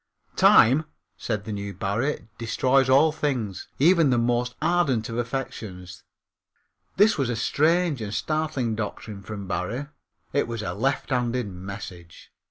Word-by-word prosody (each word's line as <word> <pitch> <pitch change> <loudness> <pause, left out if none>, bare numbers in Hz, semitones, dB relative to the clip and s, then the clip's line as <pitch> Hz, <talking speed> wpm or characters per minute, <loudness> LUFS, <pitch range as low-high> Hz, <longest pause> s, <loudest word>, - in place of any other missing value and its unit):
Time, 135 +8 +6 0.3
said 105 -3 -3
the 110 - -5
new 100 0 -5
Barrie, 110 +4 -2
destroys 130 +3 +2
all 145 +4 +5
things, 130 - -3
even 165 0 +5
the 125 - +3
most 120 +1 0
ardent 145 -11 +1
of 115 - -4
affections. 110 -8 -5 1.0
This 205 -3 +4
was 135 -3 +1
a 120 - -1
strange 155 +4 +1
and 105 -2 -4
startling 155 -2 -1
doctrine 105 -1 -5
from 100 -1 -7
Barrie. 115 - -3 0.4
It 145 - +1
was 115 -2 -4
a 85 - -3
lefthanded 125 +1 -1
message. 90 -2 -9
120 Hz, 135 wpm, -25 LUFS, 105-140 Hz, 1.0 s, Time